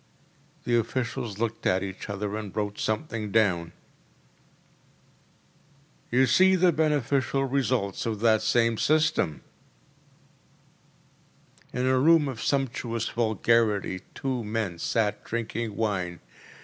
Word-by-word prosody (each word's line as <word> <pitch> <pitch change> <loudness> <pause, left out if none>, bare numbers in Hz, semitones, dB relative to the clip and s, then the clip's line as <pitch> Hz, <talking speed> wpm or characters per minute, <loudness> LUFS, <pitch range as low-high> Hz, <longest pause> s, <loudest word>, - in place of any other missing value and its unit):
‚ÄĚ - - -35 0.6
The 120 - +1
officials 115 -2 -3
looked 115 0 -2
at 95 +1 +2
each 95 +2 -7
other 100 +1 -3
and 105 -3 -6
wrote 105 -1 -3
something 110 -2 -2
down. 90 -7 +2 2.4
“You 130 +2 +4
see 185 +10 +5
the 180 -1 +4
beneficial 140 -3 +1
results 125 -7 -1
of 110 -2 -2
that 110 -2 +4
same 115 -2 +2
system!‚ÄĚ 125 - -5
In - - +1
a 130 0 +3
room 160 +1 +5
of 125 -4 -5
sumptuous 125 -3 -1
vulgarity 110 -4 +1
two 130 -3 -2
men 105 -5 -3
sat 105 +3 -1
drinking 115 -1 -4
wine. 95 -6 -2
115 Hz, 110 wpm, -26 LUFS, 105-130 Hz, 2.4 s, see